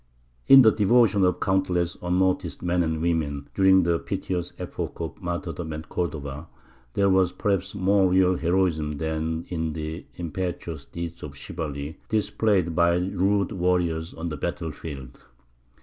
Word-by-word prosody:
In 135 -1 +10
the 110 - +7
devotion 105 -1 +4
of 90 -1 +2
countless 90 -2 +1
unnoticed 90 +1 0
men 90 0 +1
and 80 -1 -1
women 75 -4 -1
during 95 -1 +5
the 85 -1 +1
piteous 95 -2 -3
epoch - - -5
of 80 +4 -5
martyrdom 85 -2 -4
at 75 0 -7
Cordova 75 -2 -4 0.5
there 100 - +3
was 95 -2 +3
perhaps 95 0 -1
more 95 0 +3
real 95 0 +4
heroism 85 -4 0
than 80 +1 -2
in 80 -3 -2
the 80 +2 -6
impetuous 85 -3 -4
deeds 85 0 -7
of 70 -1 -8
chivalry 75 -2 -5
displayed 105 -5 +1
by 85 0 +4
rude 95 +2 +1
warriors 90 -3 0
on 85 +1 -4
the 75 - -5
battle 80 +1 -3
field. 70 -4 -9
85 Hz, 145 wpm, -25 LUFS, 80-95 Hz, 0.5 s, In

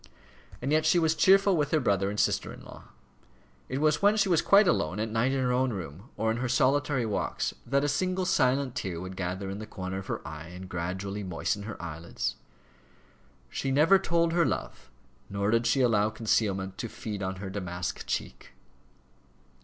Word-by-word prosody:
And 135 - -1
yet 155 +1 +3
she 160 +3 +4
was 160 -2 +3
cheerful 195 +3 +5
with 150 -3 +1
her 155 - +2
brother 100 -6 +1
and 105 +1 -3
sister - - +1
in - - -11
law. - - -12 0.8
It 130 - -2
was 150 0 +2
when 205 +1 +4
she 200 -2 +2
was 170 -3 +4
quite 200 0 +5
alone, 100 - +1
at 110 0 -2
night 115 +4 +1
in 135 - 0
her 125 -1 +1
own 130 +1 +1
room, 90 - -7
or 110 0 +1
in 115 - -1
her 125 +1 -2
solitary 135 +1 +2
walks, 105 -2 -2
that 140 +3 +2
a - - +2
single 185 +5 0
silent 135 -5 +2
tear 95 -8 -4
would 95 +1 -7
gather 95 +1 -3
in 100 - -6
the 110 - -7
corner 95 -2 -5
of 95 - -9
her - - -4
eye 80 +1 -8
and 90 +2 -9
gradually 95 +3 -4
moisten 95 +2 -2
her 110 - -7
eyelids. 85 0 -4 1.2
"She 135 - -2
never 155 +8 +5
told 170 -3 +1
her 170 0 +4
love," 145 - -3 0.4
nor 100 +1 0
did 115 +1 +2
she 125 +3 +3
allow 110 -4 +3
concealment 100 -4 -1
to 115 - -4
"feed 105 -2 -6
on 95 0 -2
her 95 0 -6
damask 90 -2 -4
cheek." - - -4
115 Hz, 195 wpm, -28 LUFS, 95-145 Hz, 1.2 s, cheerful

